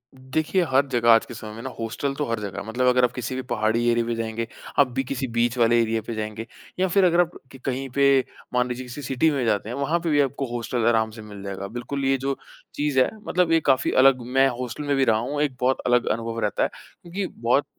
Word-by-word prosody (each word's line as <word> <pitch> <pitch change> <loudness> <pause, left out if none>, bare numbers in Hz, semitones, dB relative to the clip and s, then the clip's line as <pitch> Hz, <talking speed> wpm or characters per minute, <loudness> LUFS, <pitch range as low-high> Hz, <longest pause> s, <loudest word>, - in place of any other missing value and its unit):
देखिए, 150 +8 -1
हर 135 +1 +4
जगह 120 -1 +2
आज 115 - +5
के - - -9
समय 110 -2 -8
में 115 - -8
ना 130 - -4
हॉस्टल 115 +5 -2
तो 150 - -1
हर 115 -1 -1
जगह 100 -3 -5
है। - - -7
मतलब 125 +3 0
अगर 125 0 +4
आप 125 - +3
किसी 125 +1 -4
भी 130 - -2
पहाड़ी 110 +1 +1
एरिया 120 0 +2
पे 120 - -1
जाएँगे, 115 0 -3 0.3
आप 140 - +6
भी 135 +2 -1
किसी 135 0 -3
बीच 120 +1 +2
वाले 120 0 +4
एरिया 115 0 0
पे 115 - -3
जाएँगे 110 +1 -5 0.3
या 190 - +3
फिर 190 +2 +3
अगर 175 -1 +3
आप 175 -1 -1 0.2
क - - -12
कहीं 135 0 -2
पे, 140 +1 +4 0.3
मान 125 0 +2
लीजिए 125 +1 -5
किसी 125 +4 -8
सिटी 135 +4 +1
में 135 -4 -1
जाते 105 -1 0
हैं, 120 - -4
वहाँ 145 +5 0
पे 170 0 -2
भी 145 -2 +3
आपको 140 0 -1
हॉस्टल 120 0 -1
आराम 110 -1 +3
से 110 0 -10
मिल 105 -2 -10
जाएगा। 100 0 -5
बिल्कुल, 125 +5 -4
ये 135 0 +3
जो 135 +1 -2 0.4
चीज़ 145 -2 +1
है 130 - +4 0.2
मतलब 180 -2 +2
ये 165 - +5
काफ़ी 130 -4 +3
अलग 135 -2 +5
मैं 135 0 +6
हॉस्टल 125 +3 -4
में 145 -1 0
भी 135 - +3
रहा 110 -3 +3
हूँ, 140 +6 -2
एक 145 -4 0
बहुत 130 +1 +2
अलग 125 0 +3
अनुभव 115 0 -4
रहता 105 -2 0
है - - +1 0.3
क्योंकि 185 +3 -4
बहुत 125 +5 +3
125 Hz, 255 wpm, -24 LUFS, 115-140 Hz, 0.4 s, आप